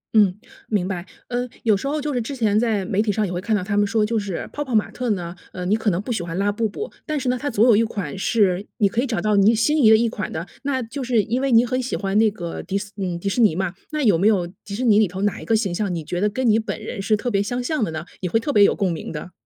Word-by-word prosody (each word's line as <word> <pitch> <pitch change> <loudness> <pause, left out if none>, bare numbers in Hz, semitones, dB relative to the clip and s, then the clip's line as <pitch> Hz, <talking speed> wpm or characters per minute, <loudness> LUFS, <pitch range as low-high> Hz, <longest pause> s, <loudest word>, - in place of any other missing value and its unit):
嗯， 200 -4 +5 0.3
明 195 -4 0
白。 180 -2 -4 0.2
嗯， 245 0 -2
有 220 -3 +4
时 235 +8 -3
候 300 +2 -1
就 295 0 -2
是 245 - 0
之 255 +5 -5
前 215 -4 +2
在 220 -4 0
媒 195 +2 +1
体 215 -1 +1
上 215 +1 0
也 185 - -4
会 175 - -3
看 220 +2 0
到 200 - -1
他 205 +2 -2
们 205 0 +3
说 220 -1 +2
就 225 +1 0
是 200 -4 -4
泡 290 - -2
泡 260 -4 -6
玛 215 - +2
特 250 -1 -3
呢， 175 -3 -3 0.2
呃， 180 -1 -5
你 200 +4 +2
可 220 -1 0
能 180 -1 0
不 240 - -5
喜 220 - -1
欢 170 +1 -5
拉 200 +1 +1
布 220 +1 -1
布， 425 - -6
但 305 -1 -1
是 260 -2 -1
呢， 250 - +1
它 290 - -1
总 225 0 +3
有 240 -3 +6
一 220 - +4
款 200 -9 -4
是 195 -2 +2
你 210 -5 +4
可 225 +4 0
以 275 - -1
找 230 -2 -1
到 215 -1 +1
你 200 +3 +5
心 295 +6 +2
仪 220 - +7
的 220 - +8
一 235 +1 +2
款 215 -2 -4
的。 160 +2 -4 0.2
那 275 -2 -1
就 260 +5 -6
是 240 -3 +2
因 240 +5 -1
为 275 -1 0
你 230 +1 +6
很 255 +1 -1
喜 255 - -3
欢 195 -1 -2
那 220 0 +5
个 175 -5 -6
迪 195 +1 -2
斯 200 0 -6
嗯， 180 -3 -3
迪 200 - -5
士 195 +5 +1
尼 210 -8 +4
嘛， 185 -1 -1 0.2
那 305 -1 -1
有 210 -7 +5
没 195 - +4
有 200 -5 +3 0.2
迪 200 - -6
士 245 - -3
尼 215 -3 +5
里 215 - +4
头 185 +2 -6
哪 205 - 0
一 - - -9
个 225 - +2
形 200 -5 0
象， 195 0 -1
你 165 -2 -3
觉 175 +3 -3
得 210 - +3
跟 255 +4 -1
你 220 0 +4
本 220 - -4
人 215 -2 -5
是 215 +2 +2
特 245 +3 -3
别 200 -2 +2
相 245 +5 -2
像 300 0 0
的 210 - -1
呢？ 160 +1 -5 0.2
你 185 - -1
会 225 - +2
特 285 +5 -2
别 205 - +6
有 - - +4
共 195 -3 0
鸣 165 - -5
的？ 165 +3 -7
215 Hz, 350 characters per minute, -22 LUFS, 195-235 Hz, 0.3 s, 的